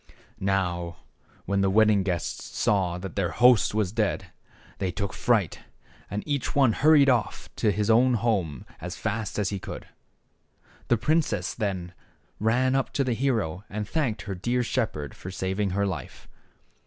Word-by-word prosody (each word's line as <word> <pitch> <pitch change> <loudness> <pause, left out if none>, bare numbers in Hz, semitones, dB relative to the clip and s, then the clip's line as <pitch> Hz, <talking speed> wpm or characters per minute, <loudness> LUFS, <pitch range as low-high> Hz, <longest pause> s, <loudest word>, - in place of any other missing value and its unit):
Now 90 -3 -1 0.5
when 100 +1 +1
the 95 - +3
wedding 105 0 +4
guests 90 -3 -3
saw 90 -4 +1
that 90 -1 -7
their 95 -4 0
host 120 +4 +4
was 105 -4 +1
dead, 110 -1 -1 0.5
they 95 - 0
took 100 +3 -3
fright, 110 -8 +1 0.5
and 105 +2 -3
each 140 -4 -1
one 135 -5 +4
hurried 150 +1 +5
off 120 -6 0
to 105 - +2
his 105 +1 -1
own 120 +3 +5
home 95 - -1
as 90 +3 -6
fast 110 0 -3
as 105 -2 +1
he 100 - -3
could. - - -7 1.0
The 120 - +3
princess 155 +7 0
then 95 -5 -3 0.5
ran 125 +4 +2
up 135 -1 0
to 140 - +1
the 125 -2 0
hero, 110 -9 -1
and 105 0 -4
thanked 130 -5 -1
her 100 - -4
dear 120 +7 0
shepherd 75 - -2
for 95 - -9
saving 95 +2 -1
her 100 +2 0
life. 85 -10 -6
105 Hz, 160 wpm, -26 LUFS, 95-120 Hz, 1.0 s, hurried